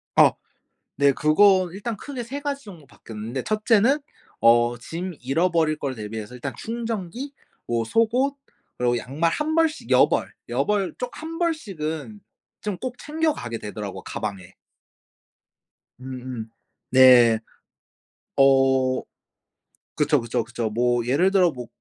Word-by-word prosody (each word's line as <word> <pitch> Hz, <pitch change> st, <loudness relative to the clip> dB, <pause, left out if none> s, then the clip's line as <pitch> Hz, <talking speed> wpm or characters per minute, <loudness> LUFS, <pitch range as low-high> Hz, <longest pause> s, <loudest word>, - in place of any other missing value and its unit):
아 -, -, +7 dB, 0.7 s
네 140 Hz, -, +6 dB
그건 185 Hz, +5 st, +4 dB
일단 210 Hz, +3 st, -4 dB
크게 260 Hz, 0 st, -6 dB
3 275 Hz, +5 st, -6 dB
가지 280 Hz, -2 st, -4 dB
정도 170 Hz, -8 st, -12 dB
바뀌었는데 115 Hz, +2 st, -7 dB
1 215 Hz, 0 st, -2 dB
째는 240 Hz, +6 st, +4 dB, 0.4 s
어 120 Hz, +1 st, +5 dB
짐 170 Hz, +8 st, -6 dB
잃어버릴 160 Hz, +3 st, +1 dB
거를 135 Hz, -2 st, -3 dB
대비해서 110 Hz, +2 st, -7 dB
일단 130 Hz, +2 st, -5 dB
충전기 230 Hz, +2 st, -5 dB, 0.3 s
뭐 115 Hz, -1 st, 0 dB
속옷 245 Hz, -, +1 dB, 0.4 s
그리고 120 Hz, 0 st, +1 dB
양말 150 Hz, +8 st, -1 dB
1 310 Hz, -, -1 dB
벌씩 325 Hz, -1 st, +1 dB
여벌, -, -, +3 dB, 0.2 s
여벌 205 Hz, -3 st, 0 dB
쪽 250 Hz, -1 st, -4 dB
1 325 Hz, +1 st, -6 dB
벌씩은 205 Hz, -, -3 dB, 0.4 s
좀 205 Hz, -4 st, -3 dB
꼭 255 Hz, -1 st, -5 dB
챙겨가게 300 Hz, -, -2 dB
되더라고요 105 Hz, -2 st, -6 dB
가방에. 95 Hz, -4 st, -6 dB, 1.5 s
음음. 125 Hz, -3 st, -7 dB, 0.4 s
네. 125 Hz, -3 st, +7 dB, 1.0 s
어 135 Hz, -1 st, +4 dB, 0.9 s
그쵸, 150 Hz, -3 st, +2 dB
그쵸, 115 Hz, -1 st, -1 dB
그쵸. 115 Hz, -1 st, -3 dB
뭐 120 Hz, +1 st, +1 dB
예를 165 Hz, +10 st, +3 dB
들어 180 Hz, -4 st, +4 dB
뭐 125 Hz, -3 st, -8 dB
155 Hz, 230 characters per minute, -24 LUFS, -, 1.5 s, 아